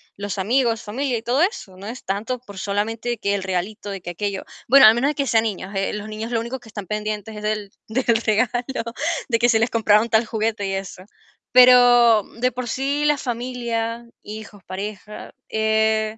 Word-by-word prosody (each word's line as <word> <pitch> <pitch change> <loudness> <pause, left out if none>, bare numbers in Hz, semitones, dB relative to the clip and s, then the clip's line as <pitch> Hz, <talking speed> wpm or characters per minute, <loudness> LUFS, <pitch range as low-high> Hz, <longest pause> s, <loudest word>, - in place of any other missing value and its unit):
los 200 -1 -5
amigos, 230 +3 +1
familia 250 +4 -2
y 225 - -7
todo 250 +5 +1
eso, 340 - -1
no 195 +2 -10
es 235 +3 -7
tanto 210 +6 -2
por 200 -6 -11
solamente 220 +4 -2
que 200 -1 -1
el 200 - -1
regalito, 190 +3 -3
de 195 -1 -5
que 175 - -6
aquello. 200 +2 -3 0.2
Bueno, 270 +1 +8
al 215 - +9
menos 260 +4 +1
de - - -8
que 280 - -1
sean 225 -1 +3
niños, 200 -3 -4
eh, 195 0 -1
los 210 0 -5
niños 215 +2 -6
lo 230 - +1
único 235 +3 -5
que 230 - -16
están 205 -2 -7
pendientes 210 +1 -4
es 210 - -7
del 210 -2 -2 0.2
del 235 +1 +1
regalo, 245 +4 0 0.5
de 230 -2 +2
que 240 +1 +3
si 230 - +4
les 230 +2 +1
compraron 220 0 +3
tal 225 +1 +3
juguete 220 -2 -2
y 195 - -2
eso. 195 -1 -6 0.5
Pero 245 -3 +7 0.2
de 250 +1 +2
por 250 0 -5
sí 280 +4 -1
la 295 -1 +3
familia, 235 -2 -3 0.2
hijos, 210 -2 -10
pareja, 205 +2 -7 0.2
eh, 220 0 +1
220 Hz, 200 wpm, -22 LUFS, 205-240 Hz, 0.5 s, al